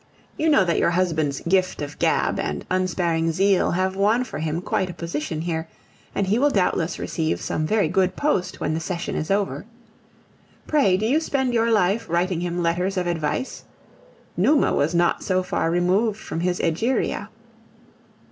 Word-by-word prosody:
You 315 Hz, -, +1 dB
know 210 Hz, -11 st, +5 dB
that 170 Hz, -2 st, +1 dB
your -, -, +3 dB
husband's 160 Hz, -5 st, 0 dB
"gift 185 Hz, +1 st, +1 dB
of 145 Hz, 0 st, -6 dB
gab" -, -, +1 dB
and 75 Hz, -1 st, -3 dB
unsparing 170 Hz, -3 st, 0 dB
zeal 195 Hz, +2 st, +2 dB
have 185 Hz, +1 st, 0 dB
won 210 Hz, +5 st, +2 dB
for 200 Hz, -, -7 dB
him 160 Hz, +1 st, -2 dB
quite 185 Hz, +1 st, -1 dB
a 175 Hz, -, -7 dB
position 155 Hz, -2 st, -4 dB
here, 160 Hz, -1 st, -3 dB, 0.5 s
and 200 Hz, -, +1 dB
he 205 Hz, +5 st, +1 dB
will 290 Hz, +2 st, +4 dB
doubtless 180 Hz, -, 0 dB
receive 160 Hz, -1 st, -2 dB
some 155 Hz, -, -2 dB
very 210 Hz, -3 st, +2 dB
good 185 Hz, +2 st, +1 dB
post 285 Hz, -11 st, -1 dB
when 155 Hz, -, -1 dB
the 160 Hz, -, -1 dB
session 170 Hz, +1 st, -4 dB
is 155 Hz, -, -3 dB
over. 200 Hz, 0 st, 0 dB, 1.0 s
Pray, 270 Hz, -12 st, +3 dB
do 215 Hz, -, -1 dB
you 270 Hz, +7 st, +3 dB
spend 265 Hz, -5 st, -1 dB
your 230 Hz, 0 st, +2 dB
life 210 Hz, 0 st, +1 dB
writing 175 Hz, +1 st, 0 dB
him 175 Hz, 0 st, -2 dB
letters 180 Hz, +3 st, 0 dB
of 180 Hz, -, 0 dB
advice? 170 Hz, -, -2 dB, 0.7 s
Numa 295 Hz, -1 st, +3 dB
was 160 Hz, +4 st, +1 dB
not 170 Hz, 0 st, +2 dB
so 185 Hz, -1 st, 0 dB
far 180 Hz, -2 st, -1 dB
removed 185 Hz, +5 st, +1 dB
from 165 Hz, -, -5 dB
his 180 Hz, +1 st, 0 dB
Egeria. 220 Hz, +11 st, 0 dB
180 Hz, 175 wpm, -23 LUFS, 165-200 Hz, 1.0 s, know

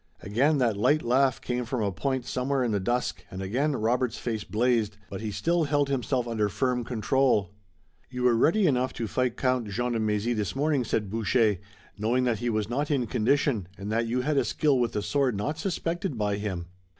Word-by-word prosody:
Again 135 Hz, +10 st, +2 dB
that 115 Hz, -6 st, +1 dB
light 145 Hz, +9 st, +3 dB
laugh 130 Hz, +2 st, +2 dB
came 125 Hz, 0 st, -2 dB
from 120 Hz, -1 st, -2 dB
a 100 Hz, -, 0 dB
point 130 Hz, +4 st, -2 dB
somewhere 130 Hz, +1 st, 0 dB
in 120 Hz, -, 0 dB
the 100 Hz, -, +1 dB
dusk 120 Hz, +6 st, -1 dB
and 95 Hz, -, -7 dB
again 130 Hz, +11 st, 0 dB
Robert's 120 Hz, +1 st, 0 dB
face 110 Hz, -3 st, -3 dB
blazed, 110 Hz, -2 st, +1 dB
but 95 Hz, -, -5 dB
he 110 Hz, -, -3 dB
still 170 Hz, -, +1 dB
held 145 Hz, -1 st, +1 dB
himself 125 Hz, -2 st, 0 dB
under 110 Hz, -3 st, 0 dB
firm 125 Hz, +3 st, 0 dB
control. 120 Hz, -4 st, +1 dB, 0.6 s
"You 125 Hz, -1 st, -4 dB
were 125 Hz, -1 st, +5 dB
ready 170 Hz, -, +3 dB
enough 130 Hz, -5 st, +1 dB
to 115 Hz, -, -3 dB
fight 125 Hz, +2 st, -1 dB
Count 125 Hz, -3 st, +1 dB
Jean 120 Hz, +5 st, -2 dB
de 115 Hz, -, 0 dB
Mézy 110 Hz, +2 st, 0 dB
this 105 Hz, 0 st, -2 dB
morning," 145 Hz, -1 st, +1 dB
said 105 Hz, -4 st, -2 dB
Boucher, 110 Hz, -1 st, +2 dB, 0.4 s
"knowing 120 Hz, +4 st, +1 dB
that 120 Hz, -4 st, +1 dB
he 120 Hz, +1 st, -1 dB
was 110 Hz, -2 st, 0 dB
not 140 Hz, +5 st, -1 dB
in 135 Hz, -5 st, +1 dB
condition 120 Hz, -, +1 dB
and 100 Hz, +2 st, -5 dB
that 115 Hz, +1 st, +1 dB
you 125 Hz, +2 st, 0 dB
had 145 Hz, +2 st, 0 dB
a -, -, +4 dB
skill 145 Hz, -4 st, +1 dB
with 120 Hz, -2 st, 0 dB
the 105 Hz, -, -1 dB
sword 135 Hz, -3 st, +1 dB
not 150 Hz, +10 st, -2 dB
suspected 170 Hz, -4 st, -2 dB
by 105 Hz, -1 st, 0 dB
him." 95 Hz, -5 st, -4 dB
120 Hz, 210 wpm, -27 LUFS, 110-135 Hz, 0.6 s, were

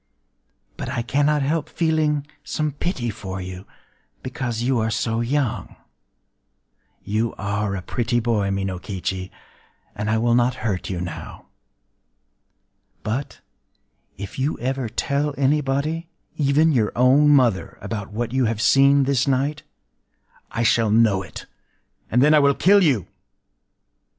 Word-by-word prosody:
But -, -, -5 dB
I 125 Hz, -3 st, -2 dB
cannot 145 Hz, +3 st, +1 dB
help 150 Hz, +2 st, -1 dB
feeling 155 Hz, -3 st, 0 dB, 0.2 s
some 155 Hz, -1 st, -2 dB
pity 135 Hz, -, -3 dB
for 95 Hz, -1 st, -6 dB
you,—because 115 Hz, -, -7 dB
you 125 Hz, -1 st, +1 dB
are 110 Hz, 0 st, 0 dB
so 115 Hz, 0 st, -1 dB
young... 130 Hz, 0 st, -2 dB, 1.3 s
You 110 Hz, +3 st, -1 dB
are 100 Hz, 0 st, -2 dB
a 90 Hz, -, -5 dB
pretty 120 Hz, +2 st, -1 dB
boy, 110 Hz, -4 st, 0 dB
Minokichi; 95 Hz, -1 st, -3 dB, 0.6 s
and 105 Hz, +1 st, -3 dB
I 110 Hz, -, +2 dB
will 120 Hz, +1 st, +2 dB
not 120 Hz, +1 st, +2 dB
hurt 95 Hz, -5 st, -2 dB
you 90 Hz, -2 st, -3 dB
now. 90 Hz, -1 st, -7 dB, 1.6 s
But, 120 Hz, +6 st, -4 dB, 0.8 s
if 100 Hz, +5 st, -7 dB
you 140 Hz, +4 st, 0 dB
ever 130 Hz, -1 st, -2 dB
tell 140 Hz, +5 st, -1 dB
anybody—even 150 Hz, +2 st, 0 dB
your 115 Hz, -7 st, +1 dB
own 130 Hz, +4 st, +5 dB
mother—about 105 Hz, -5 st, +1 dB
what 115 Hz, +2 st, -3 dB
you 130 Hz, -1 st, +2 dB
have 110 Hz, -1 st, -1 dB
seen 140 Hz, +3 st, +5 dB
this 135 Hz, -1 st, +1 dB
night, 140 Hz, +3 st, 0 dB, 0.9 s
I 115 Hz, -, -2 dB
shall 115 Hz, -1 st, +3 dB
know 105 Hz, -3 st, +3 dB
it; 95 Hz, -, -9 dB, 0.6 s
and 125 Hz, +3 st, +3 dB
then 150 Hz, +2 st, +5 dB
I 155 Hz, -, +7 dB
will 140 Hz, -1 st, +4 dB
kill 200 Hz, +2 st, +5 dB
you... 135 Hz, -, +2 dB
120 Hz, 125 wpm, -22 LUFS, 105-140 Hz, 1.6 s, I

